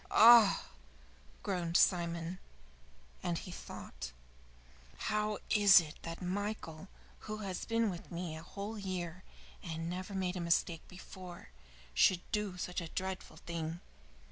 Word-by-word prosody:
"Ah," 225 -3 +8 0.8
groaned 175 -4 +1
Simon, 170 0 +2 0.8
and 175 -1 -1
he 180 - -7
thought, 60 - -7 0.9
"How 210 - 0
is 205 -3 +9
it 155 -3 -5
that 165 +2 -6
Michael, 190 -3 -3 0.4
who 215 - -2
has 185 -2 -3
been 230 0 +2
with 175 - -9
me 170 -2 -4
a 160 - -7
whole 200 +5 -6
year 185 -2 -4 0.4
and 165 -2 -4
never 185 +2 -5
made 185 -1 -1
a - - -3
mistake 170 -1 +1
before, 180 - -10 0.4
should 175 - +5
do 210 -3 -1
such 180 +1 -3
a 170 - -5
dreadful 185 -3 -4
thing? 165 0 -4
180 Hz, 130 wpm, -34 LUFS, 170-200 Hz, 0.9 s, is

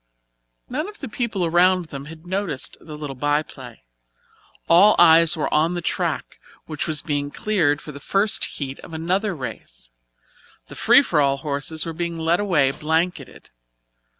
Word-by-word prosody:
None 300 +8 -3
of 420 - -13
the 270 - -6
people 220 -5 -2
around 175 +1 +3
them 140 0 -7
had 160 +2 -12
noticed 185 -6 -3
the 155 -2 -9
little 145 -3 -6
by 145 +3 +1
play. 125 - -12 0.8
All 195 +6 +6
eyes 165 -1 +6
were 150 - -2
on 160 +3 +2
the 175 - -3
track, - - -2 0.3
which 155 0 -4
was 155 -2 -2
being 145 -2 -2
cleared 160 -5 0
for 150 - -8
the 140 - -10
first 195 +7 0
heat 135 -2 -6
of - - -12
another 185 +5 -1
race. - - -8 0.8
The - - -10
free - - +5
for 150 - +1
all 140 -1 +2
horses 150 +3 -3
were 165 - -4
being 170 0 -3
led 165 +2 +1
away 165 -10 +2
blanketed. 160 +5 -3
160 Hz, 165 wpm, -22 LUFS, 145-180 Hz, 0.8 s, All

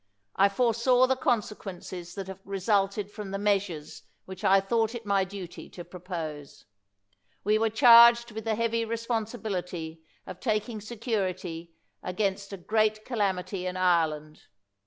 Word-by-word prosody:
I 200 +1 +5
foresaw 245 +3 +3
the 265 +1 +1
consequences 190 -7 -3
that 195 - -5
have 190 0 -9
resulted 200 +1 0
from 205 -1 -7
the 195 - -3
measures 195 -7 -1 0.2
which 190 0 -10
I 195 +1 +5
thought 225 +4 0
it 230 -2 -7
my 200 -1 +2
duty 190 -2 -8
to 175 - -10
pro 180 +1 -11
pose. 160 -5 -7 0.8
We 215 +2 +2
were 225 0 +2
charged 235 0 +7
with 220 +1 -7
the 220 -1 +1
heavy 230 0 0
respon 230 0 -2
sibility 180 -8 -5 0.3
of 185 -1 -9
taking 215 -1 -2
security 190 -7 -4 0.3
against 195 +1 -2
a 195 - -5
great 215 +3 0
calam 200 -7 0
ity 185 0 -5
in 185 0 -4
Ireland. 160 -4 0
200 Hz, 150 wpm, -28 LUFS, 180-225 Hz, 0.8 s, charged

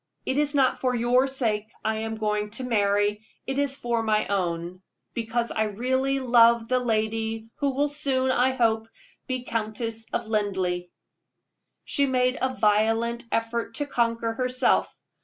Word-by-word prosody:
It 260 - 0
is 295 0 0
not 270 -2 +3
for 255 -1 0
your 245 +3 +3
sake 225 -6 -1 0.2
I 220 0 +1
am 225 0 -3
going 210 -1 -1
to 260 - -5
marry; 205 -2 +1 0.2
it 270 +1 -2
is 280 -1 0
for 235 -3 -1
my 215 -1 +1
own, 180 -2 -2 0.3
because 235 0 -2
I 220 -1 0
really 260 +6 0
love 235 -2 +5
the 255 +1 +2
lady 225 -1 -1
who 280 -2 0
will 290 +2 +2
soon, 270 -3 0
I 260 +1 +2
hope, 225 -3 +1 0.4
be 255 -1 -2
Countess 225 0 -3
of 235 - -2
Linleigh." 190 -5 -1 1.0
She 280 -1 +1
made 255 -1 +1
a 260 - +1
violent 225 +3 +2
effort 230 0 -2
to 290 - -1
conquer 230 -4 0
herself. 255 +1 +1
230 Hz, 155 wpm, -26 LUFS, 215-255 Hz, 1.0 s, love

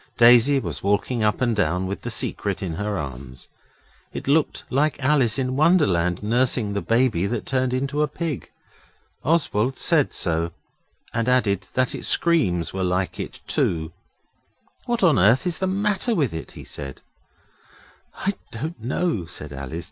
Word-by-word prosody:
Daisy 120 +4 +7
was - - -4
walking 105 +4 0
up 105 +3 +1
and 120 -3 +2
down 95 -3 0
with 100 +1 -4
the - - -5
Secret - - -2
in 90 -3 -3
her 105 +3 -2
arms. 65 -4 -7 0.6
It - - -7
looked 150 +2 +2
like 145 +3 +1
Alice 130 -4 +2
in 130 -1 -1
Wonderland 100 - +3
nursing 120 -1 +1
the 100 - -1
baby 115 -6 +2
that 115 +2 -3
turned 130 -1 0
into 140 +3 -1
a 150 - +3
pig. 155 -4 -4 0.7
Oswald 135 -6 +1
said 160 -5 +2
so, 85 -1 -1 0.6
and 115 +1 0
added 110 -7 +1
that 130 -1 +1
its - - -4
screams 95 - +1
were 95 0 -2
like 90 +1 -1
it - - -6
too. 80 -1 0 1.0
'What 240 -3 0
on 165 - +5
earth 110 - +4
is 175 -3 -2
the 190 - 0
matter 205 +4 0
with 140 - +1
it?' 80 - -7
he - - -10
said. 70 -3 -7 1.1
'I 200 - -1 0.2
don't 135 +1 -6
know,' 125 - -1
said 75 -3 -7
Alice. 70 +4 -5
120 Hz, 160 wpm, -23 LUFS, 95-145 Hz, 1.1 s, Daisy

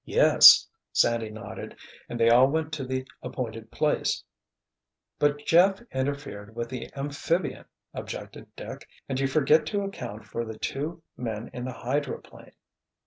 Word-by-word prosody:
"Yes," - - +8 0.2
Sandy 115 -2 +2
nodded, 110 0 -8 0.3
"and 120 - -5
they 115 - +4
all 125 +2 +7
went 160 +1 -1
to 150 -3 -3
the 130 0 -3 0.2
appointed 115 -3 -5
place——" - - 0 1.0
"But 145 0 +1
Jeff 190 +4 +5
interfered 130 -6 -4
with 115 0 -3
the 130 -1 -6
amphibian," 145 +5 -2 0.3
objected - - -7
Dick, - - -9 0.2
"and 135 -1 -2
you 135 - +2
forget 155 +2 +3
to 205 -1 -1
account 120 - -6
for 115 +2 -4
the 110 -1 -7
two 160 +8 -4
men 115 -2 -5
in 125 0 -5
the 130 - -3
hydroplane." 140 +4 -4
130 Hz, 140 wpm, -27 LUFS, 115-145 Hz, 1.0 s, Yes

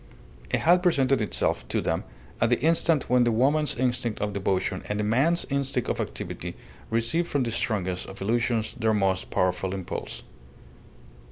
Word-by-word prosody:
It - - 0
had 175 +2 +5
presented 135 -8 +3
itself 105 - -1
to - - 0
them - - -1 0.4
at 115 - +4
the 120 - +2
instant 160 0 +2
when 125 0 +4
the 120 - +2
woman's 145 +6 +2
instinct 120 -2 -1
of 105 0 -2
devotion 95 -1 -1
and 105 - -1
the - - +1
man's 135 +11 +2
instinct 135 -3 0
of - - -1
activity - - -5 0.3
receive 115 +10 +1
from 140 -5 0
the 115 - -2
strongest 95 -6 -1
of 95 - -10
illusions 115 +1 0
their 110 -3 +1
most 95 -2 0
powerful 90 +1 0
impulse. 95 -3 -5
115 Hz, 165 wpm, -26 LUFS, 105-135 Hz, 0.4 s, had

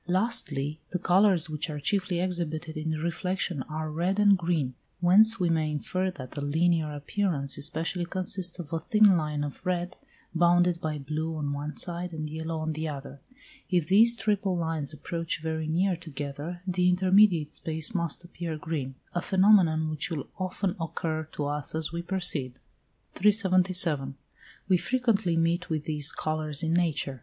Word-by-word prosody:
Lastly, 160 -7 0
the 180 - -2
colours 185 -1 +3
which 155 0 -3
are 150 -1 -4
chiefly 185 +1 0
exhibited 170 -3 -2
in 155 +1 -3
reflection 170 0 -2
are 155 0 -4
red 175 +5 -1
and 205 -1 +5
green, 165 -7 -1 0.3
whence 205 +5 +5
we 180 - +1
may 160 -2 +1
infer 185 +5 -2
that 130 -8 -9
the 145 - -5
linear 160 +1 +1
appearance 145 -1 -1
especially 165 +4 0
consists 180 -1 -2
of 165 -3 -8
a 165 - 0
thin 210 +3 +4
line 150 -3 -1
of 145 +2 -7
red, 180 -1 -2 0.4
bounded 175 0 +3
by 155 -1 -2
blue 155 +3 -4
on 145 -2 -3
one 145 +2 -5
side 175 0 -3
and 155 -1 -5
yellow 160 +1 -4
on 155 0 -2
the 155 +1 -3
other. 140 -1 -8 0.5
If 175 -4 +1
these 225 +7 +6
triple 200 -3 0
lines 160 -4 -2
approach 165 +2 -4
very 160 0 -3
near 180 +4 +1
together, 155 +1 -7
the 180 -1 +2
intermediate 185 -3 +3
space 160 +6 -1
must 170 -2 -2
appear 170 -2 -6
green; 150 -4 -4 0.2
a 175 - -1
phenomenon 185 -5 +4
which 155 0 -2
will 155 -5 -4
often 185 0 -2
occur 160 -1 -3
to 145 - -3
us 145 +1 -3
as 160 -1 -2
we 170 0 -4
proceed. 170 -8 -2 0.6
377. 185 -8 +4 0.5
We 185 -1 +4
frequently 220 -6 0
meet 170 +2 0
with 155 -2 -2
these 150 -2 +1
colours 155 -1 -2
in 160 0 0
nature. 160 -6 0
165 Hz, 165 wpm, -27 LUFS, 155-180 Hz, 0.6 s, these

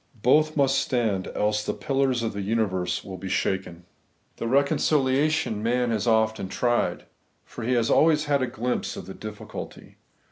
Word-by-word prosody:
Both 155 +5 +3
must 135 -1 +3
stand, 110 -7 0
else 105 0 +1
the - - -3
pUlars 135 -3 0
of 110 - -2
the 100 - -4
universe 100 -4 -1
will 95 -2 -8
be 95 +1 -6
shaken. 95 -2 -2 0.5
The - - -4
o^econciliation 140 -1 +2
man 120 +3 0
has 110 +1 -1
often 110 -3 +1
tried; 120 +3 0 0.4
for 120 - -9
he 125 +3 0
has 120 -2 +2
always 155 -1 +4
had 145 -2 +1
a 130 - 0
glimpse 125 0 -3
of - - -7
the 95 - -8
difficulty. 105 0 -9
120 Hz, 165 wpm, -25 LUFS, 105-135 Hz, 0.5 s, always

